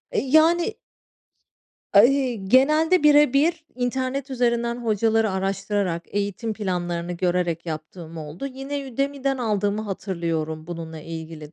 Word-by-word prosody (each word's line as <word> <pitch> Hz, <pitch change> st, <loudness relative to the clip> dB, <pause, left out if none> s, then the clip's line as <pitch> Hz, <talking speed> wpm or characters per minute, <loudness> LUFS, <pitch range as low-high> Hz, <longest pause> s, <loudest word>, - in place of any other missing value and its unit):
E, 485 Hz, -, -1 dB
yani 325 Hz, +7 st, +3 dB, 1.2 s
Ay 245 Hz, +2 st, +4 dB
Genelde 305 Hz, -, +4 dB
bire 295 Hz, -3 st, +6 dB
bir 320 Hz, +3 st, +2 dB
internet 260 Hz, +2 st, -2 dB
üzerinden 235 Hz, -1 st, 0 dB
hocaları 220 Hz, 0 st, +2 dB
araştırarak, 195 Hz, -2 st, -1 dB
eğitim 205 Hz, +2 st, -3 dB
planlarını 175 Hz, -4 st, -3 dB
görerek 175 Hz, -1 st, -1 dB
yaptığım 160 Hz, +1 st, -7 dB
oldu. 155 Hz, -, -6 dB
Yine 270 Hz, 0 st, -6 dB
Udemy'den 275 Hz, +1 st, -1 dB
aldığımı 210 Hz, -2 st, 0 dB
hatırlıyorum, 165 Hz, -6 st, -3 dB
bununla 165 Hz, -2 st, -7 dB
ilgili 160 Hz, -1 st, -8 dB
215 Hz, 110 wpm, -23 LUFS, 175-270 Hz, 1.2 s, bire